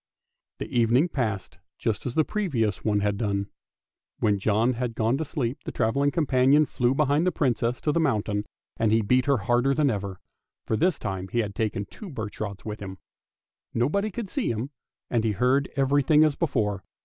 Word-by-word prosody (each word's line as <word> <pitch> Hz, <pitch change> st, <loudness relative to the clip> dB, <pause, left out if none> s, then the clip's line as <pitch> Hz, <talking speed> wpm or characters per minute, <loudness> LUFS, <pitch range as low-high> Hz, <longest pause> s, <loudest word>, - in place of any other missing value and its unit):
The -, -, -4 dB
evening 120 Hz, +8 st, +3 dB
passed 110 Hz, -, -3 dB, 0.2 s
just 110 Hz, +2 st, -2 dB
as 125 Hz, -, -4 dB
the 155 Hz, -, +4 dB
previous 130 Hz, -, -1 dB
one 105 Hz, -2 st, +1 dB
had 100 Hz, 0 st, 0 dB
done. 100 Hz, -2 st, -1 dB, 0.7 s
When 105 Hz, -3 st, +1 dB
John 110 Hz, +5 st, +2 dB
had 120 Hz, -1 st, -3 dB
gone 115 Hz, +3 st, +1 dB
to 160 Hz, -, -1 dB
sleep 130 Hz, -3 st, -2 dB
the -, -, -5 dB
travelling 135 Hz, +5 st, +1 dB
companion 145 Hz, -1 st, +3 dB
flew 125 Hz, -2 st, 0 dB
behind 150 Hz, +4 st, +2 dB
the -, -, +3 dB
Princess 125 Hz, -5 st, 0 dB
to 150 Hz, -, +1 dB
the 170 Hz, -, +1 dB
mountain, 105 Hz, -8 st, 0 dB, 0.3 s
and 110 Hz, -2 st, +2 dB
he 110 Hz, 0 st, +3 dB
beat 125 Hz, +5 st, +2 dB
her 140 Hz, -1 st, +4 dB
harder 120 Hz, +6 st, +2 dB
than 150 Hz, -3 st, +3 dB
ever, 100 Hz, -3 st, -4 dB, 0.5 s
for -, -, 0 dB
this 170 Hz, +9 st, +2 dB
time 95 Hz, -2 st, -4 dB
he 120 Hz, -, -4 dB
had 100 Hz, -2 st, -4 dB
taken 105 Hz, -1 st, -2 dB
two 195 Hz, -, -10 dB
birch 110 Hz, -8 st, -6 dB
rods 100 Hz, -3 st, -5 dB
with 105 Hz, -1 st, -5 dB
him. 95 Hz, -1 st, -7 dB, 0.8 s
Nobody 155 Hz, -, +1 dB
could 215 Hz, +1 st, -5 dB
see 255 Hz, +6 st, -1 dB
him, 115 Hz, +5 st, -3 dB, 0.4 s
and 115 Hz, -2 st, +1 dB
he 110 Hz, -2 st, +1 dB
heard 130 Hz, +7 st, +2 dB
everything 145 Hz, +2 st, +4 dB
as 155 Hz, -2 st, +3 dB
before. 105 Hz, -, -1 dB
120 Hz, 190 wpm, -26 LUFS, 105-140 Hz, 0.8 s, the